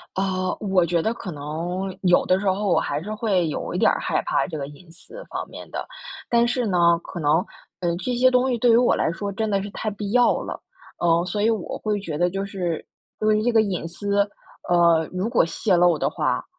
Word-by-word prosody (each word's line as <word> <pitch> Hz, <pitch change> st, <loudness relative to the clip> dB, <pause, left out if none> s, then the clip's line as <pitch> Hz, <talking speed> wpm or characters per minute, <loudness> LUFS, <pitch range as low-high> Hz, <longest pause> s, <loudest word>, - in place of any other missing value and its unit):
啊， 185 Hz, -1 st, -1 dB
我 190 Hz, -4 st, +2 dB
觉 170 Hz, 0 st, +1 dB
得 220 Hz, +7 st, 0 dB
可 190 Hz, -6 st, -7 dB
能 170 Hz, +6 st, -4 dB
有 180 Hz, -2 st, +4 dB
的 185 Hz, -, +3 dB
时 200 Hz, -, -4 dB
候 195 Hz, +2 st, +1 dB
我 180 Hz, -, +3 dB
还 145 Hz, +2 st, -2 dB
是 210 Hz, +4 st, -5 dB
会 195 Hz, -6 st, +1 dB
有 150 Hz, -, -4 dB
一 -, -, -1 dB
点 -, -, +4 dB
儿 -, -, 0 dB
害 -, -, 0 dB
怕 -, -, +1 dB
这 160 Hz, -, -6 dB
个 140 Hz, -, -4 dB
隐 165 Hz, +4 st, -15 dB
私 -, -, -12 dB
方 -, -, -4 dB
面 -, -, -10 dB
的， -, -, -5 dB, 0.4 s
但 235 Hz, 0 st, +3 dB
是 245 Hz, 0 st, 0 dB
呢， 170 Hz, -3 st, +4 dB
可 175 Hz, -, -8 dB
能， 150 Hz, 0 st, +3 dB, 0.4 s
呃， 170 Hz, -2 st, 0 dB
这 245 Hz, +8 st, -2 dB
些 255 Hz, +2 st, +4 dB
东 255 Hz, +1 st, +2 dB
西 245 Hz, -, 0 dB
对 240 Hz, +1 st, +3 dB
于 230 Hz, -, +6 dB
我 245 Hz, +1 st, +4 dB
来 -, -, +1 dB
说 200 Hz, +4 st, -4 dB
真 220 Hz, +3 st, -2 dB
的 200 Hz, -2 st, 0 dB
是 205 Hz, -, -6 dB
太 215 Hz, +2 st, -3 dB
必 205 Hz, 0 st, -5 dB
要 245 Hz, 0 st, +4 dB
了。 -, -, -6 dB, 0.4 s
呃， 170 Hz, 0 st, +2 dB
所 180 Hz, +3 st, -3 dB
以 220 Hz, -, +3 dB
我 215 Hz, -6 st, -3 dB
会 210 Hz, -1 st, -1 dB
觉 165 Hz, -7 st, -5 dB
得 175 Hz, +1 st, +3 dB
就 195 Hz, +2 st, -3 dB
是 180 Hz, -5 st, -3 dB, 0.3 s
因 215 Hz, -, 0 dB
为 215 Hz, 0 st, +3 dB
这 245 Hz, -, +2 dB
个 225 Hz, -2 st, +4 dB
隐 185 Hz, -5 st, -3 dB
私， 200 Hz, +4 st, -2 dB, 0.5 s
呃， 170 Hz, -2 st, +4 dB
如 185 Hz, +4 st, -1 dB
果 -, -, +4 dB
泄 190 Hz, +3 st, 0 dB
露 175 Hz, -2 st, +4 dB
的 -, -, +1 dB
话， -, -, -1 dB
190 Hz, 255 characters per minute, -23 LUFS, 170-215 Hz, 0.5 s, 于